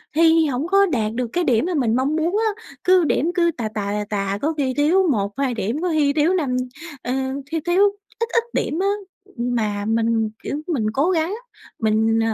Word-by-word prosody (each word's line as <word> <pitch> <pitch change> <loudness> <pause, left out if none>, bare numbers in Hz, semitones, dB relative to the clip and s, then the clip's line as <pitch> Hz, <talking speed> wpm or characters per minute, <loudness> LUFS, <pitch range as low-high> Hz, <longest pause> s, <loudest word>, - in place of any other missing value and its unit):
thi 325 0 +5
hổng 280 +2 -1
có 395 +2 +5
đạt 220 - -1
được 245 +1 -2
cái 355 - +1
điểm 245 -2 +2
mà 365 - -1
mình 240 -7 +1
mong 270 +4 +1
muốn 335 +5 0 0.2
á, 455 - -16 0.2
cứ 370 -1 +5
điểm 325 +2 +1
cứ 340 -2 +3
tà 220 -3 -2
tà, 200 -1 -2
tà 210 0 -2
tà, 200 -1 -1
có 315 +3 0
khi 265 -3 0
thiếu 350 +6 +3
1-2 240 +4 -1
điểm, 230 +7 -2
có 360 - 0
khi 295 -3 +2
thiếu 310 +4 +2
năm 285 -9 0 0.5
ờ, 245 - -2 0.3
thiếu 320 +3 -3
thiếu 355 +3 +4 0.4
ít 465 - 0
ít 465 - +3
điểm 315 - -1
á. 390 - +1 0.5
Mà 220 -4 -1
mình, 225 0 +1
kiểu, 290 - -3
mình 275 -11 -1
cố 285 +8 +2
gắng, 335 +3 0 0.4
mình, 220 0 +2
280 Hz, 205 wpm, -21 LUFS, 225-335 Hz, 0.5 s, thi